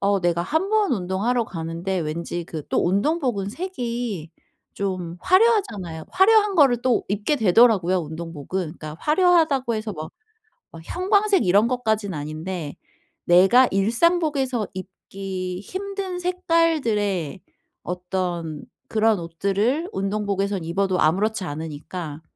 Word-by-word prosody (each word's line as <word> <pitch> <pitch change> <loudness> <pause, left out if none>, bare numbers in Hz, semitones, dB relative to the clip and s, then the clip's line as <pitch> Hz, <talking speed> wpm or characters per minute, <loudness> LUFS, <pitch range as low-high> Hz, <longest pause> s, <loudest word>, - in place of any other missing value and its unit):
어 200 0 +2
내가 175 -1 +1
1 320 - -1
번 430 -7 +2
운동하러 210 +5 0
가는데 170 +1 -4
왠지 170 +2 -4
그 160 -2 -6
또 - - +1
운동복은 205 - 0
색이 235 - -4 0.4
좀 185 -3 -3
화려하잖아요. 365 - +2
화려한 415 +1 +4
거를 255 -6 +5
또 250 -3 +2
입게 210 +9 0
되더라고요 200 -4 +4
운동복은. 165 +2 -5 0.2
그러니까 155 0 -7
화려하다고 310 -7 +3
해서 215 -1 -3
막, 155 -2 -7 0.6
막 165 - -11
형광색 395 - +2
이런 200 +5 +4
것까진 220 -5 -1
아닌데 155 +1 -5 0.5
내가 190 +9 +6
일상복에서 265 - +1
입기 185 -1 -6
힘든 385 - -5
색깔들의 300 - 0 0.4
어떤 180 -3 -3 0.3
그런 220 -2 +2
옷들을 200 - -1
운동복에선 200 -1 -1
입어도 185 +2 0
아무렇지 195 +6 +1
않으니까 155 0 -6
200 Hz, 285 characters per minute, -23 LUFS, 175-270 Hz, 0.6 s, 내가